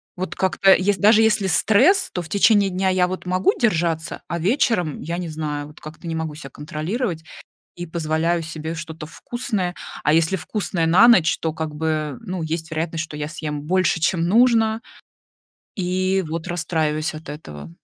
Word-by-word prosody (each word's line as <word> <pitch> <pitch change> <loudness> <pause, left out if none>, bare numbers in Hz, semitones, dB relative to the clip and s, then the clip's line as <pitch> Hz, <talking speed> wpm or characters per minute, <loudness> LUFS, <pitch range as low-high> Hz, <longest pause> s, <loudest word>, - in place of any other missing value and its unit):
Вот 185 +1 -5
как-то 190 +1 +4
ес 195 +1 +2
даже 215 +2 +5
если 215 -3 +2
стресс, 245 - +4
то 180 - -2
в 160 - -11
течение 200 0 +4
дня 190 +1 -1
я, 185 -1 +2
вот, 185 0 -6
могу 185 +1 +2
держаться, 170 -7 0
а 170 - -2
вечером 195 - +1
я 170 +2 -4
не 180 -2 -4
знаю, 150 -2 -4
вот, 150 - -16
как-то 155 +2 -10
не 165 - -3
могу 160 -2 -4
себя 140 -3 -9
контролировать 160 - -4 0.5
и 175 - -5
позволяю 165 +1 -1
себе 160 0 -6
что-то 160 -1 -7
вкусное. 200 -2 -3 0.3
А 150 - +3
если 165 +3 +3
вкусное 175 -1 -2
на 185 +8 +6
ночь, 180 -9 +5
то, 160 -1 -2
как 155 -1 -4
бы, 155 -1 -2
ну, 185 -6 -4
есть 160 0 -4
вероятность, 160 0 -2
что 150 - -10
я 150 0 -4
съем 150 -2 -5
больше, 175 -1 +1
чем 170 +1 +1
нужно, 225 +1 +3 1.0
и, 185 +1 0
вот, 165 +1 -4
расстраиваюсь 160 -2 -1
от 155 -1 -10
этого. 80 - -9
170 Hz, 175 wpm, -22 LUFS, 155-190 Hz, 1.0 s, на